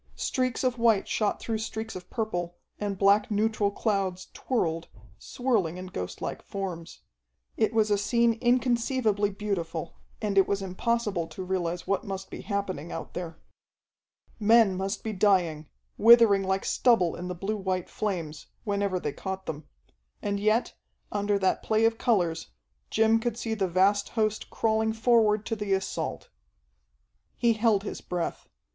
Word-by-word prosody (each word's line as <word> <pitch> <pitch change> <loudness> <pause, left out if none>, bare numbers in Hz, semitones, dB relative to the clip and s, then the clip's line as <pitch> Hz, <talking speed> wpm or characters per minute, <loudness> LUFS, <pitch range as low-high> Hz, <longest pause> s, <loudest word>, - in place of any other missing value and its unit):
Streaks 255 -1 -1
of 250 -2 0
white 225 -4 +3
shot 210 -2 0
through 225 -1 -3
streaks 220 0 -5
of 180 -1 -9
purple 175 -7 -3 0.2
and 205 -2 -2
black 200 +2 +4
neutral 215 -1 +1
clouds 195 -3 -2
twirled, 165 -10 -1 0.3
swirling 215 -10 -1
in 185 - -6
ghostlike 90 - -5
forms. 180 -4 -6 0.5
It - - +2
was 220 -1 +2
a 205 - +3
scene 235 +3 +3
inconceivably 240 -4 +2
beautiful, 190 -6 -4 0.3
and 205 -2 +2
it 190 - +4
was 200 -1 -1
impossible 195 -2 -1
to 185 - -7
realize 180 -2 -2
what 195 0 0
must 195 -1 -6
be - - -7
happening 190 -6 -3
out - - -6
there. 170 -2 -5 1.0
Men 220 -2 +5
must 195 +2 -3
be 220 - -3
dying, 180 -6 +2 0.3
withering 225 -3 +7
like 190 0 0
stubble 205 -9 +3
in 180 - -6
the 180 - -4
blue 195 +5 -2
white 185 -2 -2
flames, 170 -8 -4 0.2
whenever 200 -3 0
they 150 -4 -3
caught 190 0 -5
them. 155 -1 -6 0.5
And 200 0 -2
yet, 215 +3 +1 0.4
under 205 0 +1
that 190 -1 +1
play 220 0 +2
of 225 0 +1
colors, 175 -9 +1 0.4
Jim 225 +1 +3
could 235 0 -2
see 225 -1 -2
the 200 -3 0
vast 195 +3 +2
host 215 -2 -1
crawling 220 0 +1
forward 220 -2 +3
to 225 - -2
the 210 -2 -1
assault. 190 0 -3 1.1
He 235 -1 +3
held 215 -2 +2
his - - -6
breath. 175 -2 -4
205 Hz, 150 wpm, -27 LUFS, 185-220 Hz, 1.1 s, withering